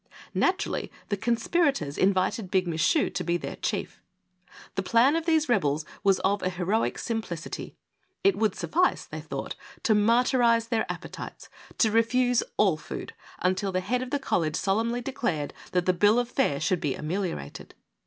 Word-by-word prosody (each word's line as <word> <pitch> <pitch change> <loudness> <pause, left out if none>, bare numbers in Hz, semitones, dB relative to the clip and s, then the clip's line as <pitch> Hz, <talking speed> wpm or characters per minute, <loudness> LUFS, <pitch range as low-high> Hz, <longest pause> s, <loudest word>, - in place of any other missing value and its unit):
Naturally 380 +2 0 0.2
the 205 - +1
conspirators 235 - +1
invited 190 +1 +1
Big 185 -1 +1
Michu 170 - +2
to - - -3
be 170 +1 +1
their - - -6
chief. - - -3 0.7
The - - -1
plan 245 +6 +4
of 330 0 -2
these 320 -1 +3
rebels 155 - +1 0.2
was 195 -2 +4
of 200 +2 +1
a 185 - 0
heroic 185 +5 0
simplicity. 220 -8 -4 0.5
It 395 -1 +4
would 215 -3 +1
suffice, 315 - +1
they - - -7
thought, - - -5 0.3
to 225 - +4
martyrize 230 +1 +3
their 225 -2 0
appetites - - -8
— - - -20
to 220 - +3
refuse 245 +2 +3 0.2
all 190 -7 +4
food - - -7 0.3
until 185 +2 +1
the 185 - 0
head 250 +6 -1
of 255 - -4
the 285 - 0
college 165 - 0
solemnly 230 +5 0
declared 230 - -2 0.2
that 180 -1 +1
the 185 - +3
bill 205 +5 +4
of 245 -1 +1
fare 245 - +1
should 170 +3 0
be 140 -4 -1
ameliorated. 165 - -4
210 Hz, 165 wpm, -27 LUFS, 180-245 Hz, 0.7 s, plan